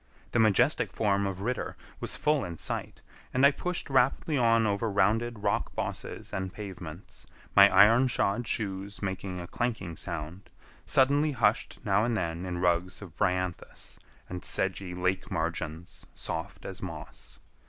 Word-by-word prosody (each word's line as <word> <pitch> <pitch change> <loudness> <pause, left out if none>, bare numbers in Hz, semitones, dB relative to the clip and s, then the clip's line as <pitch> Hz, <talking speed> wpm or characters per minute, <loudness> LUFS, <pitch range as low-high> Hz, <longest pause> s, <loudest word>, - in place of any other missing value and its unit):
The 120 - +1
majestic 110 -3 +3
form 100 -2 +1
of 95 -1 -5
Ritter 125 +5 -3 0.2
was - - -3
full 150 -2 +2
in 85 -1 -6
sight, - - -4 0.3
and 130 +2 +5
I 140 - +8
pushed 180 +5 -3
rapidly 135 +3 +2
on 115 -3 +4
over 105 +2 0
rounded 105 +3 +1
rock - - 0
bosses - - -4
and 95 -1 -3
pavements, 95 -4 -9 0.3
my 100 0 +9
iron 115 +7 +6
shod 120 -1 0
shoes 100 -1 -3
making 95 -1 -3
a 85 - -5
clanking 100 -5 -3
sound, 85 +4 -5 0.4
suddenly 145 +3 +3
hushed 120 -3 +1
now 100 +1 +3
and 115 -1 +1
then 85 0 -3
in 90 -1 -3
rugs 90 +2 0
of 85 -4 -12
bryanthus, 90 -3 -2 0.3
and 90 0 -6
sedgy 95 -1 0
lake 90 +1 -1
margins 80 +1 -4
soft - - -5
as - - -6
moss. - - -9
100 Hz, 150 wpm, -29 LUFS, 90-115 Hz, 0.4 s, my